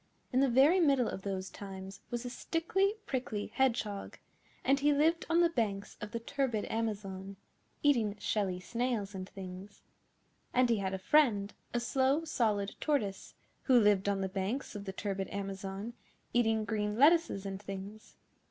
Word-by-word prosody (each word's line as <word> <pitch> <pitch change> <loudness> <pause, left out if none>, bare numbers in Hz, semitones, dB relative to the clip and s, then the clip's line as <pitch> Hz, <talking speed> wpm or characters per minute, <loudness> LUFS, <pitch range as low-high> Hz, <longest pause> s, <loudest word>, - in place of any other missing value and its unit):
In 255 - +4
the 270 0 +4
very 275 +9 +5
middle 275 -8 +4
of 190 - -4
those 190 -1 -4
times 195 -1 -8
was 240 0 -3
a - - -3
Stickly 385 - 0
Prickly 245 -5 -3
Hedgehog, 225 -6 0 0.5
and 275 +1 +4
he 295 +1 +4
lived 320 +3 +2
on 335 +1 +4
the 340 - +5
banks 205 -9 -2
of 210 - -4
the 230 - -3
turbid 240 -3 -1
Amazon, 200 -3 -3 0.5
eating 235 -8 +3
shelly 195 -3 -1
snails 230 -1 -2
and 185 0 -6
things. 190 +1 -9 0.7
And 250 -1 +4
he 230 - +3
had 190 -1 -1
a - - -2
friend, 210 -2 +3 0.2
a 240 - 0
Slow 270 +5 +1
Solid 210 -9 0
Tortoise, 215 -11 -1 0.3
who 255 -3 +6
lived 205 -2 +4
on 195 -1 0
the 190 - 0
banks 195 +8 -3
of 205 -2 -7
the 190 - -3
turbid 195 -1 -3
Amazon, 195 +2 -5 0.4
eating 225 -2 +2
green 210 -1 -1
lettuces 295 - +4
and 195 0 -5
things. 195 +2 -8
215 Hz, 160 wpm, -32 LUFS, 195-260 Hz, 0.7 s, who